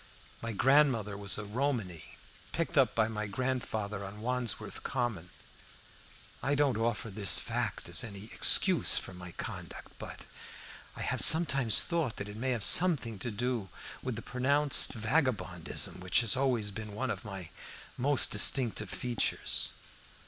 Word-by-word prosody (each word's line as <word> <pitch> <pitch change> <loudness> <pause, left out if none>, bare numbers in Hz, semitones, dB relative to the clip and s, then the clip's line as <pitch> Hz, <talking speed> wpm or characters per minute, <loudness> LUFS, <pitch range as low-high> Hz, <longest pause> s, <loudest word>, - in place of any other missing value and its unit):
My 115 - -3
grandmother 130 -4 +3
was 100 0 -1
a 105 - -4
Romany, 105 - -3 0.4
picked 165 +1 -2
up 135 -6 +3
by 110 -1 +3
my 105 -1 -4
grandfather 110 -4 -3
on 100 +2 -8
Wandsworth 125 0 -3
Common. 120 -9 -3 1.1
I 140 +2 +1
don't 140 -4 +2
offer 115 0 -1
this 100 0 +3
fact - - -3
as - - +1
any 100 -3 -7
excuse - - +5
for - - -4
my 90 -1 -9
conduct, - - -7
but - - -9 0.7
I - - -4
have - - 0
sometimes 140 -8 +5
thought 165 -9 -1
that 100 - -6
it 105 - -8
may 125 +4 -2
have 120 -5 0
something 135 - +3
to 120 - -4
do 115 -2 -2 0.3
with 130 -2 -4
the 110 - -7
pronounced 140 +3 +2
vagabondism 110 - -1
which 90 +4 +2
has 115 -3 +2
always 125 -6 0
been 105 0 -7
one - - -2
of - - -5
my 95 -5 -8 0.4
most 135 -1 +3
distinctive 110 -1 +1
features. 120 +2 -1
115 Hz, 150 wpm, -31 LUFS, 105-130 Hz, 1.1 s, excuse